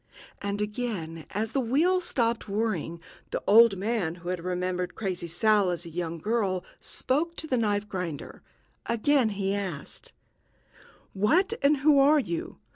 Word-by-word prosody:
And 200 +1 -1
again, 210 -8 -4
as 215 +2 -2
the 275 - 0
wheel 310 +10 +2
stopped 230 - -1
whirring, 195 -6 -1 0.3
the - - -3
old 225 -1 +7
man 195 -5 -1
who 175 0 -8
had 180 -2 -3
remembered 180 0 -2
Crazy 185 -5 -3
Sal 205 +3 +3
as 175 0 -3
a 170 - -8
young 170 0 -3
girl 195 -1 -1
spoke 320 +6 -1
to - - -4
the 270 - 0
knife 210 -3 0
grinder; 180 -7 -5 0.5
again 240 +1 +2
he 195 -1 -1
asked: 185 -8 -5 1.0
"What 325 - +2
and 285 +1 +4
who 295 -2 +7
are 290 +3 +6
you? 170 - -4
205 Hz, 150 wpm, -27 LUFS, 180-235 Hz, 1.0 s, old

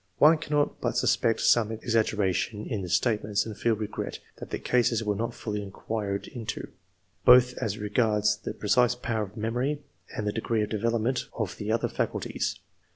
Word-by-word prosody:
One 155 +2 +6
cannot 150 -2 0
but - - -1
suspect 115 - +2
some 115 -2 +4
ex 115 +1 -3
aggeration 105 -1 0
in 110 -6 -3
the 90 - -5
statements, 105 +1 +1
and 110 -2 -6
feel 115 +1 +1
regret 105 0 -4 0.2
that - - -8
the - - -2
cases 120 -2 +1
were 105 -1 0
not 115 +3 -3
fully 105 -2 -3
inquired 100 0 -4
into, 115 -4 -5 0.5
both 125 0 +7
as 105 -1 -2
regards 105 0 +1
the - - -6
precise 125 +3 +3
power 115 -3 -2
of 105 +1 -6
memory, 125 +7 -1 0.3
and 105 - -2
the 105 - +1
degree 110 -1 0
of 105 - -3
development 115 +3 0
of 105 -6 -2
the 105 +1 -3
other 115 - +1
faculties. - - -2
110 Hz, 175 wpm, -27 LUFS, 105-120 Hz, 0.5 s, both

